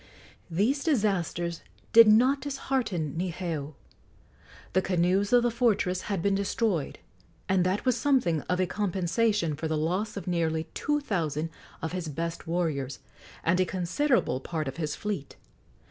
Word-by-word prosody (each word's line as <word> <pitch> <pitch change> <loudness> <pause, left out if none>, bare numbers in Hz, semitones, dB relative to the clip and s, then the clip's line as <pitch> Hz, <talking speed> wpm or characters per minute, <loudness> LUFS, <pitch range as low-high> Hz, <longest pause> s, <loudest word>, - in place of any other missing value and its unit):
These 220 - +1
disasters 185 - 0 0.3
did 230 -1 +9
not 255 +6 +5
dishearten 255 - -2
Niheu. 165 -4 -3 1.0
The 185 - +4
canoes 185 +2 +1
of 245 -1 +5
the 240 - +2
fortress 210 -6 +1
had 195 -5 -1
been 200 - +2
destroyed, 200 -4 0 0.5
and 190 -1 +3
that 190 +6 -1
was 255 -2 +3
something 240 - +2
of 180 +1 +1
a 185 - +3
compensation 195 -2 0
for 160 +2 -3
the 155 0 -1
loss 185 +7 -1
of 190 - -5
nearly 165 -3 0
two 295 0 0
thousand 165 - -2 0.3
of 160 - -2
his 180 -2 -3
best 165 +3 -4
warriors 155 -6 -1 0.5
and 170 +2 +2
a - - +5
considerable 185 - +1
part 155 +2 -3
of 135 - -5
his 155 -3 -2
fleet. 200 -9 -4
185 Hz, 145 wpm, -28 LUFS, 165-215 Hz, 1.0 s, did